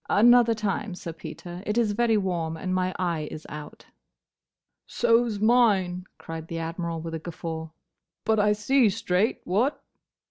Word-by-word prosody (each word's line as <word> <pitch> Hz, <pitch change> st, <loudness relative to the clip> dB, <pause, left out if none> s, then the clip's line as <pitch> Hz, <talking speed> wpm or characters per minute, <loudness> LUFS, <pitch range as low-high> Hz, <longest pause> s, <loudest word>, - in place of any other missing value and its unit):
"Another 235 Hz, +1 st, +6 dB
time, 210 Hz, -2 st, -2 dB
Sir 170 Hz, -2 st, -7 dB
Peter. 175 Hz, +2 st, -8 dB
It 210 Hz, +2 st, -2 dB
is 230 Hz, -3 st, +3 dB
very 225 Hz, +1 st, +2 dB
warm, 170 Hz, -5 st, -1 dB
and 185 Hz, +3 st, -3 dB
my 185 Hz, 0 st, +1 dB
eye 170 Hz, -4 st, -1 dB
is 155 Hz, -, -8 dB
out." 150 Hz, 0 st, -9 dB, 1.0 s
"So 235 Hz, 0 st, +3 dB
's 210 Hz, -2 st, -4 dB
mine," 205 Hz, -6 st, +3 dB
cried 165 Hz, 0 st, -7 dB
the 165 Hz, -, -5 dB
Admiral, 165 Hz, 0 st, -3 dB
with 165 Hz, 0 st, -6 dB
a 160 Hz, -, -3 dB
guffaw; 160 Hz, -1 st, -6 dB, 0.6 s
"but 220 Hz, -1 st, +3 dB
I 210 Hz, 0 st, +4 dB
see 230 Hz, +3 st, +3 dB
straight, 205 Hz, 0 st, 0 dB
what?" 230 Hz, +11 st, 0 dB
185 Hz, 155 wpm, -26 LUFS, 165-220 Hz, 1.0 s, Another